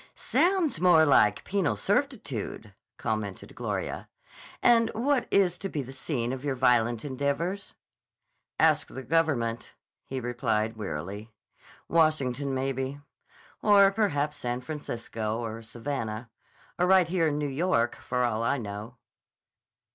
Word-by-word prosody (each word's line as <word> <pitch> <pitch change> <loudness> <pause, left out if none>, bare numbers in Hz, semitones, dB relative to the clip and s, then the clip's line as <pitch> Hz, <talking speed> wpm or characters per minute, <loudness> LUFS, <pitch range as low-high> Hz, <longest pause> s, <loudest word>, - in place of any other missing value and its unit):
"Sounds 345 - +1
more 175 -3 +6
like 105 -8 +4
penal 185 - 0
servitude," 145 - -2 0.2
commented 110 -4 -4
Gloria. - - -4 0.5
"And 230 -1 +5
what 250 +2 +1
is 180 -3 +2
to 195 - -4
be 150 -6 -3
the 130 - -9
scene 130 -3 -2
of 130 0 -6
your 140 -2 -1
violent 120 -2 +2
endeavors?" 145 +8 -2 0.8
"Ask - - +4
the 130 - -8
Government," 130 -6 0 0.3
he 130 - -3
replied 115 -2 -1
wearily. 100 +2 -5 0.6
"Washington, 145 -5 +2
maybe. 135 +1 -2 0.6
Or 200 -2 +6
perhaps 150 -8 0
San 125 -3 -3
Francisco 115 -6 -4
or 115 -1 -5
Savannah. 115 -1 -5 0.5
Or 180 - +3
right 185 -2 +5
here 170 -2 +1
in 145 -1 0
New 150 -1 -1
York, 135 -5 +1
for 125 0 -2
all 115 -2 0
I 125 +5 +1
know." 105 +1 -7
135 Hz, 125 wpm, -28 LUFS, 115-170 Hz, 0.8 s, more